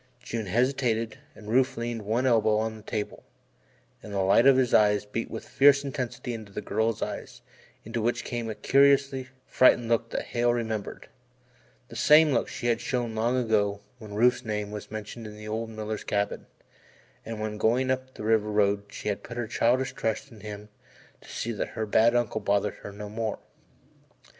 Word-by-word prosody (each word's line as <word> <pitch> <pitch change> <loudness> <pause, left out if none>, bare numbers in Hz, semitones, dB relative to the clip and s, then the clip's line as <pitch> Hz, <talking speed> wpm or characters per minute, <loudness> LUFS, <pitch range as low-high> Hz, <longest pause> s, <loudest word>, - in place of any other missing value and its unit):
June 115 -4 -5
hesitated 115 0 0 0.2
and 105 - -13
Rufe 130 +3 +2
leaned 115 -1 -3
one 110 +5 0
elbow 110 -3 +3
on 110 0 -1
the 110 - -11
table, 105 0 -5 0.8
and 105 - -10
the 100 -1 0
light 100 +7 +5
in 135 -1 +7
his 130 -2 +2
eyes 105 -1 +4
beat 115 +3 -4
with - - -7
fierce 140 0 +5
intensity 125 -3 -4
into 110 -3 -8
the 100 - -5
girl's 110 +2 -1
eyes - - -7 0.4
into 115 +1 -3
which 120 +2 0
came 120 -2 -4
a 110 - -4
curious 140 +2 +4 0.3
frightened 120 -2 +4
look 115 0 +1
that - - -3
Hale 120 0 +1
remembered 110 -3 -4 0.8
the - - -11
same 150 +5 +6
look 115 - +1
she - - -7
had 120 -1 +1
shown 120 -3 -2
long 115 +3 +1
ago 105 -4 +1 0.2
when 105 -2 -9
Rufe's 125 +3 +3
name 105 -2 -3
was 105 -1 -7
mentioned 110 +1 -7
in 105 - -10
the 105 0 -9
old 110 +1 -3
miller's 110 -1 -5
cabin, 100 0 -2 0.8
and 115 -1 -6
when 105 -1 -4
going 125 +4 +2
up 130 0 -3
the - - -7
river 110 -1 +2
road 100 -1 +2
she - - -8
had 105 -1 -1
put 120 - -9
her 120 - -1
childish 125 +3 +1
trust 115 +3 -3
in 110 - -13
him 105 0 -8 0.5
to - - -16
see 115 - -3
that 105 - -3
her 110 - 0
bad 115 +3 +4
uncle 120 -2 0
bothered 100 0 +1
her - - -7
no 105 +1 -8
more. 110 0 -3
115 Hz, 190 wpm, -27 LUFS, 105-120 Hz, 0.8 s, in